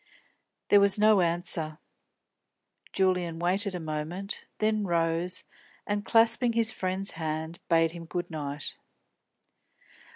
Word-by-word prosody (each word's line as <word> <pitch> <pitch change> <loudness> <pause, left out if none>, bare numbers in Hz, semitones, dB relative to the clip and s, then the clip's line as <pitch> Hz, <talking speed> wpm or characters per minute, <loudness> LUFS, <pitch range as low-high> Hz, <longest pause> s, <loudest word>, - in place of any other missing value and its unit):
There 205 - +7
was 200 0 +3
no 210 -2 +5
answer. 170 -2 0 1.1
Julian 180 -3 0
waited 185 +3 0
a - - -3
moment, 160 +5 -5
then 215 -1 +1
rose 170 0 0 0.4
and, 205 0 -2
clasping 230 +2 +4
his 225 -1 +4
friend's 190 +1 -1
hand, 160 +1 -4
bade 165 -1 +3
him 170 0 -9
good 175 +2 -5
night. 145 -2 -6
175 Hz, 110 wpm, -28 LUFS, 165-200 Hz, 1.1 s, There